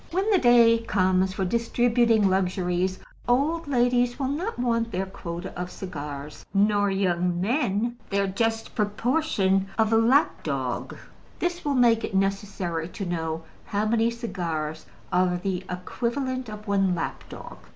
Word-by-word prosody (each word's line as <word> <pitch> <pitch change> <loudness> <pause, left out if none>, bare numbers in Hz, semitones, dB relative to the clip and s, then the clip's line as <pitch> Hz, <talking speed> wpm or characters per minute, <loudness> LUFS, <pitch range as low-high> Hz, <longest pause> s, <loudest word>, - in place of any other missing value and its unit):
When 385 +5 0
the 390 - +5
day 235 -3 +6
comes 190 -4 +1
for 190 0 -1
distributing 235 0 +2
luxuries, 185 -1 0 0.3
old 300 +7 +1
ladies 245 -2 +2
will 265 -2 -1
not 345 +11 -3
want 230 -2 0
their 190 0 -1
quota 180 -1 -7
of 180 0 -4
cigars, 150 -6 -7
nor 205 0 +3
young 180 -2 0
men 235 - 0
their 200 0 +1
just 225 +3 -1
proportion 210 -3 +1
of 220 0 +2
lap 235 +7 +3
dog; - - -3 0.4
this 350 0 -2
will 285 -2 0
make 235 -2 +4
it 195 - -3
necessary 195 -4 -1
to 195 +3 -6
know 165 -2 -3 0.2
how 205 +1 -1
many 225 +1 +2
cigars 165 -10 -4 0.3
are 180 0 +3
the 185 0 -3
equivalent 250 +7 -3
of 210 0 -9
one 195 -2 +2
lap 165 - -4
dog. - - -9
205 Hz, 140 wpm, -25 LUFS, 185-240 Hz, 0.4 s, day